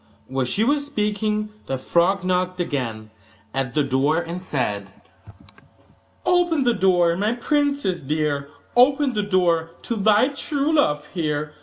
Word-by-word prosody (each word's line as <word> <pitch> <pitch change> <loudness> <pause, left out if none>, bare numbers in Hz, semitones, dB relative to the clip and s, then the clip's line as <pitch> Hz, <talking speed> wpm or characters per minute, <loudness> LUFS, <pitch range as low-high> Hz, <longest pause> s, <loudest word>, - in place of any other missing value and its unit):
While 130 0 -1
she 200 - 0
was 285 +4 +2
speaking 215 -4 -1 0.2
the 135 - -2
frog 175 +7 +1
knocked 185 0 0
again 115 -10 -3 0.4
at 135 0 -2
the 150 - +3
door, 140 +3 +1
and 170 +1 -4
said: 185 - -2 1.4
'Open 350 -5 +2
the 240 -1 +3
door, 180 -4 +3
my 210 +5 0
princess 280 - 0
dear, 145 -1 -1 0.3
Open 270 +2 +4
the 210 - 0
door 175 -5 +1
to 235 - -3
thy 215 +4 +4
true 285 +1 -2
love 150 - +2
here! 150 -4 -2
185 Hz, 140 wpm, -22 LUFS, 150-240 Hz, 1.4 s, Open